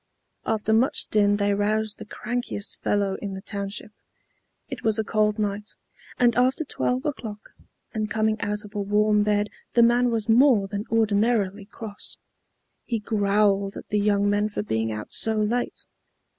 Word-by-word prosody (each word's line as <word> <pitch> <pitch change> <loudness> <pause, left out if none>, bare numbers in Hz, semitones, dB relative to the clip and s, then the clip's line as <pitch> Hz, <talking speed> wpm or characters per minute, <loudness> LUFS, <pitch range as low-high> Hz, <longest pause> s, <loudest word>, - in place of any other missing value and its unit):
After 220 0 +1
much 235 +4 +2
din 205 -1 +3
they 205 0 +1
roused 215 +1 0
the - - -9
crankiest 225 -1 -4
fellow 200 -2 0
in 200 -2 -4
the 190 - -7
township. 200 0 -5 0.8
It - - -7
was 220 -1 +2
a 220 - +1
cold 210 0 +1
night, 210 0 -3 0.4
and 240 -2 +3
after 255 +5 +2
12 255 0 -1
o'clock, 225 -8 -5 0.4
and 215 -1 -2
coming 215 0 0
out 210 0 -2
of 210 - -13
a 205 - -2
warm 210 +1 +3
bed 210 0 +1 0.2
the 235 - +6
man 240 +1 +4
was 225 -3 -1
more 230 -3 +5
than 205 +2 -4
ordinarily 215 -2 +1
cross. 210 -1 -10 0.7
He 235 - -2
growled 200 -2 +1
at - - -10
the 210 - +1
young 205 0 +2
men 205 +1 +1
for 205 - -3
being 110 - -1
out 105 0 -6
so 220 0 +1
late. 220 +3 -1
210 Hz, 165 wpm, -25 LUFS, 205-225 Hz, 0.8 s, the